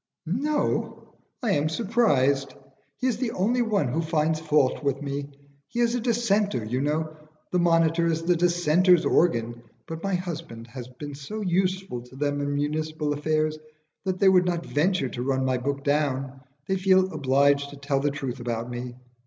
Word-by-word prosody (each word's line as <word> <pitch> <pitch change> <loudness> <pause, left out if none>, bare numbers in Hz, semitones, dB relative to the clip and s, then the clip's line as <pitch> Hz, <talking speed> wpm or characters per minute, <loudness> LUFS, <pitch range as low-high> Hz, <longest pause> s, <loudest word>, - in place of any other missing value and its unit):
"No! 285 - -1 0.3
I 225 - +1
am 150 -2 +1
surprised. 155 - +1 0.4
He 255 - -3
is 250 -4 +1
the 235 -2 -2
only 235 +7 +1
one 210 - +1
who 160 +7 0
finds 160 -1 0
fault 150 -3 +1
with 140 -1 0
me. 140 0 -4 0.4
He 240 - -5
is 235 -1 +3
a 245 - 0
Dissenter, 215 - +1
you 125 +4 -1
know. 155 +2 -1 0.4
The 180 - +2
'Monitor' 165 -1 +3
is 165 0 0
the 175 +1 +3
Dissenters' 175 0 +3
organ, 120 -8 +1 0.2
but 160 0 -7
my 195 0 0
husband 165 -10 -5
has 120 0 -9
been 140 +3 -8
so 145 +11 -6
useful 185 -6 -1
to 125 +2 -15
them 145 +1 -1
in 145 0 -1
municipal 150 +1 -1
affairs 155 +1 0 0.4
that 185 -1 -1
they 195 - +4
would 185 -1 +5
not 170 -1 -1
venture 150 -2 +1
to 120 - -5
run 130 0 0
my 130 -1 +1
book 140 +2 -3
down; 135 -2 -1 0.3
they 190 - +1
feel 190 -1 +3
obliged 140 0 +2
to 145 - -10
tell 140 0 -1
the 145 +1 +1
truth 135 -3 -4
about 120 0 -3
me. 120 0 -6
155 Hz, 180 wpm, -26 LUFS, 140-185 Hz, 0.4 s, would